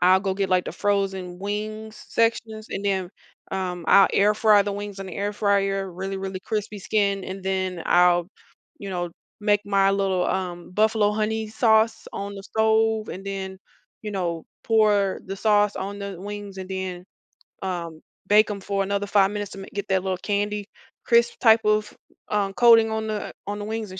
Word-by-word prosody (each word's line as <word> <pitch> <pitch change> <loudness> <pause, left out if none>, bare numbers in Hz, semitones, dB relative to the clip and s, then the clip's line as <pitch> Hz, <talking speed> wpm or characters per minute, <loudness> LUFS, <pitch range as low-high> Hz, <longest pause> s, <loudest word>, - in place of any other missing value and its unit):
I'll 185 +1 +5
go 190 -1 -1
get, 195 0 -1
like, 185 -1 +3
the - - -4
frozen 195 -3 -1
wings 215 +2 -5
sections, 225 -1 0
and 200 - -4
then, 190 -3 0 0.4
um, 180 -2 -3
I'll 195 -1 +7
air 210 +1 +4
fry 210 -1 +5
the 200 0 -3
wings 205 0 -6
in 195 - -6
the 185 - -8
air 205 +1 -1
fryer, 195 -2 +1
really, 190 +2 -5
really 190 -1 -5
crispy 210 -1 -3
skin 200 -1 0
and 190 +1 -6
then 185 -2 -2
I'll, 175 0 +4 0.5
you 200 - -7
know, 175 -1 -2 0.3
make 205 -1 +3
my 195 -1 +3
little, 195 -2 +1
um, 180 -2 -3
buffalo 215 +1 +2
honey 220 +1 -1
sauce 220 0 +2
on 200 0 -5
the 195 - -8
stove, 220 +1 +1
and 190 - -7
then, 190 -1 -5 0.4
you 215 - -4
know, 170 -4 -3 0.2
pour 210 -3 +2
the 195 +1 -5
sauce 205 0 +3
on 200 +1 -5
the 200 -3 -6
wings, 205 0 -7
and 185 -1 -6
then, 190 -2 -4 0.6
um, 170 -4 -4 0.3
bake 210 +2 +5
'em 200 - -4
for 195 0 -1
another 200 +1 -2
5 200 -1 +3
minutes 205 -1 -4
to 195 - -9
ma 195 - -8
get 200 0 -4
that 190 -1 +2
little 190 -1 -1
candy 205 +2 -2 0.4
crisp 235 0 +3
type 225 -2 +6
of, 210 0 +1 0.4
um, 200 -2 0
coating 230 0 +6
on 220 0 -2
the 215 -1 -4
on 205 +1 -3
the 205 - -5
wings 220 -2 -4
and 190 - -8
200 Hz, 190 wpm, -24 LUFS, 190-210 Hz, 0.6 s, I'll